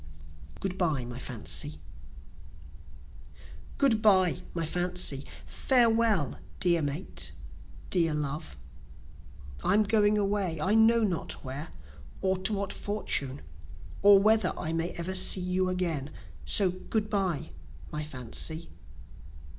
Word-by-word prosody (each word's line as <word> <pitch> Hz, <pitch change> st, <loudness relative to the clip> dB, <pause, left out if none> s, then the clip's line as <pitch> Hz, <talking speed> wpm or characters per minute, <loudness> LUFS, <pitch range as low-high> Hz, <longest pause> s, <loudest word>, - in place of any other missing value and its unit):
Good 190 Hz, -1 st, -4 dB
Bye 155 Hz, -8 st, 0 dB
My 120 Hz, 0 st, -7 dB
Fancy! 130 Hz, +4 st, +1 dB, 2.0 s
Good 240 Hz, -6 st, +2 dB
bye 190 Hz, -5 st, +4 dB
my 165 Hz, -1 st, -1 dB
Fancy! 175 Hz, -4 st, +1 dB, 0.2 s
Farewell 230 Hz, -, +2 dB, 0.2 s
dear 170 Hz, -2 st, +2 dB
mate, 145 Hz, -, -4 dB, 0.6 s
dear 165 Hz, -4 st, +2 dB
love! 145 Hz, -, -5 dB, 1.1 s
I'm 215 Hz, +1 st, +3 dB
going 210 Hz, 0 st, +2 dB
away, 200 Hz, -5 st, -1 dB
I 190 Hz, +7 st, +2 dB
know 225 Hz, +1 st, +4 dB
not 185 Hz, -6 st, -2 dB
where, 135 Hz, +5 st, -4 dB, 0.5 s
Or 190 Hz, 0 st, 0 dB
to 190 Hz, +3 st, -1 dB
what 200 Hz, -1 st, -3 dB
fortune, 145 Hz, -10 st, -1 dB, 0.6 s
or 200 Hz, 0 st, +7 dB
whether 215 Hz, -1 st, +2 dB
I 160 Hz, -, -3 dB
may 165 Hz, +1 st, -1 dB
ever 170 Hz, +2 st, -4 dB
see 190 Hz, 0 st, +6 dB
you 185 Hz, +1 st, -1 dB
again, 170 Hz, -6 st, -2 dB, 0.4 s
So 195 Hz, -3 st, +1 dB
Good 210 Hz, +4 st, -3 dB
bye 185 Hz, -, -1 dB, 0.4 s
my 150 Hz, -, -4 dB
Fancy. 150 Hz, +4 st, -2 dB
180 Hz, 115 wpm, -28 LUFS, 150-205 Hz, 2.0 s, or